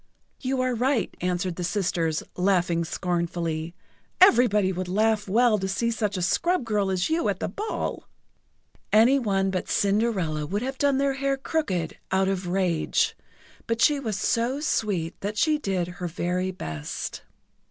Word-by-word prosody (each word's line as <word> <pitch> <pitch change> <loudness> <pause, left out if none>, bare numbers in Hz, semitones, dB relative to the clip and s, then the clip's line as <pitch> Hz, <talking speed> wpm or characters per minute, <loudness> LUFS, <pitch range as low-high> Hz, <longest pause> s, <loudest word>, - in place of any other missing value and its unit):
"You 260 -1 -1
are 255 0 +1
right," 250 +1 0
answered 180 0 -1
the 180 - -3
sisters, 170 -4 0
laughing 180 -2 +2
scornfully. 170 -1 -2 0.4
"Everybody 240 - +5
would 185 0 -3
laugh 210 +2 +1
well 220 +2 +3
to 190 - -2
see 230 +5 0
such 210 -4 -1
a 180 - -1
scrub 345 - +1
girl 210 -3 0
as 190 - 0
you 330 +1 +1
at - - -2
the - - -2
ball!" 435 +2 -4 0.8
Any 235 +6 +5
one 195 -5 0
but 185 - -3
Cinderella 195 -8 +1
would 205 +6 -2
have 265 +1 -4
done 280 -2 +3
their 275 0 +1
hair 275 0 -1
crooked 200 - -2
out 190 0 +2
of 190 -2 -2
rage, 180 -3 +1 0.5
but 230 0 -1
she 290 +4 +4
was 220 -7 -3
so 235 +7 0
sweet 195 - -1
that 210 +2 -3
she 305 +7 +2
did 190 -8 -1
her 180 0 -5
very 180 +2 -1
best. 80 - -5
195 Hz, 160 wpm, -25 LUFS, 180-245 Hz, 0.8 s, Everybody